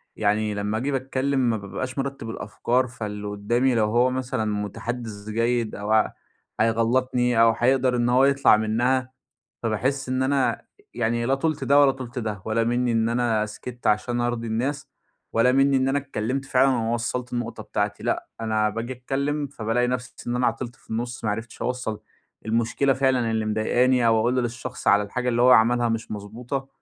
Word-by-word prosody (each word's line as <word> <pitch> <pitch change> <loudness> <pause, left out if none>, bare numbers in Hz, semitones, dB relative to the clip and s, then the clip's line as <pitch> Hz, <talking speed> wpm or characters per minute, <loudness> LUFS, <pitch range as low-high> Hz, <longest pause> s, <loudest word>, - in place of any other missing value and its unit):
يعني 105 0 +1
لمّا 105 +1 -2
أجي 135 +5 -1
باتكلّم 135 +1 -1
ما 110 - +1
بابقاش 125 +6 -5
مرتب 135 -4 -4
الأفكار، 125 +2 -1
فاللي 105 -3 -6
قدّامي 120 +5 +1
لو 110 -2 +3
هو 120 +4 +3
مثلًا 125 -4 -2
متحدث 105 +1 -4
جيد 115 0 0
أو 105 +1 -4
ع 110 -1 +3 0.5
هيغلطني 120 +1 +2
أو 115 0 +6
هيقدر 130 0 +2
إن 120 0 +1
هو 130 +2 +5
يطلع 140 -5 +5
منها، 120 +4 0 0.5
فباحس 125 +5 -1
إن 130 0 0
أنا 135 0 +1 0.3
يعني 120 0 0
لا 135 - +3
طُلت 150 -1 -1
ده 140 +2 +5
ولا 140 -1 +6
طُلت 130 -2 -6
ده، 105 -4 -4
ولا 115 +1 +1
مِنّي 120 0 +1
إن 115 0 +2
أنا 115 -3 +1
سكتت 120 +3 -8
عشان 120 +3 +1
أرضي 120 -1 -1
الناس، 130 +6 -2 0.4
ولا 125 +3 +4
مِنّي 135 0 +4
إن 130 0 +2
أنا 140 +1 +2
اتكلّمت 130 -1 -3
فعلًا 135 0 +3
وما 115 -2 0
وصلت 120 +1 -3
النقطة 120 -2 -4
بتاعتي. 105 0 -2
لأ، - - -2
أنا 110 -1 +1
باجي 115 +4 -4
أتكلّم 140 +4 -2
فبالاقي 125 -2 -1
نفسي 125 0 -3
إن 120 0 -1
أنا 125 - +2
عطلت 120 +1 -3
في - - -24
النُص، 120 +1 -4
ما 105 - +1
عرفتش 115 +2 -5
أوصّل 125 -4 -3 0.5
المشكلة 115 +5 +1
فعلًا 130 -3 +1
اللي 110 -1 0
مضايقاني 120 +3 +2
أو 115 -1 +4
أقول 120 +3 +1
للشخص 120 +1 -6
على 105 +1 +5
الحاجة 125 +5 -3
اللي 120 0 +2
هو 125 - +6
عملها 120 0 +5
مش 115 0 -3
مضبوطة، 120 +6 -5
120 Hz, 180 wpm, -24 LUFS, 110-130 Hz, 0.5 s, أو